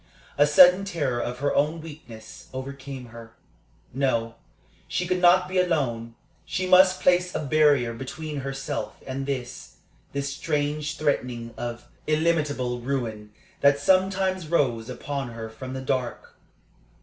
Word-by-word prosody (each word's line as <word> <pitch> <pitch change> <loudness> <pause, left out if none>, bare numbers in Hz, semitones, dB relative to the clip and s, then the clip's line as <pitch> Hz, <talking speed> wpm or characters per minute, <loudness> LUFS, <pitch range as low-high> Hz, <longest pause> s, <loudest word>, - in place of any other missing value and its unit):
A 145 - +4
sudden 180 +5 +7
terror 145 -11 -1
of 125 +1 -4
her 145 - +1
own 150 +3 +1
weakness 145 -8 -11
overcame 135 -1 -7
her. 115 0 -12 0.6
No, 120 -4 0 0.5
she 180 - -1
could 180 0 -1
not 180 +1 +5
be 185 0 0
alone. 125 -10 0 0.3
She 185 - -2
must 185 0 +6
place 180 0 +3
a - - 0
barrier 140 -5 +3
between 150 +5 -6
herself 135 0 -4
and 135 +1 -4
this 130 -2 -5 0.4
this 140 -1 -3
strange 150 0 -2
threatening 125 -6 -1
of 120 0 -5 0.2
illimitable 150 -6 +1
ruin 115 -5 -3 0.3
that 140 0 +5
sometimes 190 +1 +2
rose 125 -8 +1
upon 135 +2 -4
her 110 -1 -7
from 130 +4 -8
the 130 - -4
dark. 130 -2 -3
140 Hz, 135 wpm, -25 LUFS, 125-165 Hz, 0.6 s, sudden